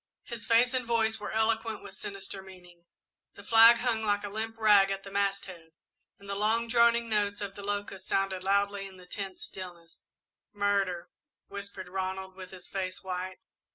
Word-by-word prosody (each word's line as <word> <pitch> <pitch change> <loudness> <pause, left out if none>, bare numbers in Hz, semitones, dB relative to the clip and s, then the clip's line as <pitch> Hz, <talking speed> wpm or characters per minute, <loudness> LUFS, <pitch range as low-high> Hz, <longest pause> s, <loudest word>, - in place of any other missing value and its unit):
His 235 -2 -7
face 240 +2 +5
and 255 -1 +1
voice 220 -1 +2
were 205 - -5
eloquent 220 0 0
with 200 - -10
sinister 195 0 -6
meaning. 180 -2 -15 0.5
The - - -12
flag 230 0 +8
hung 235 -2 0
like 205 -1 +1
a 205 - -4
limp 220 +2 -4
rag 205 -3 +6
at 195 0 -3
the 195 - -9
masthead 195 -4 -2 0.4
and 200 - -15
the 200 - -2
long 220 +3 +1
droning 235 0 +4
notes 205 -2 +1
of 200 -2 -4
the 200 - -9
locusts 200 -1 -4
sounded 195 -1 0
loudly 200 0 +1
in 190 -1 -13
the 180 - -14
tense 195 - -6
stillness. 175 - -10 0.5
"Murder," 200 -4 0 0.4
whispered 200 -2 -7
Ronald, 190 +1 -3
with 185 -1 -9
his 185 -1 -10
face 185 -1 -3
white. 185 0 -4
200 Hz, 175 wpm, -30 LUFS, 190-220 Hz, 0.5 s, flag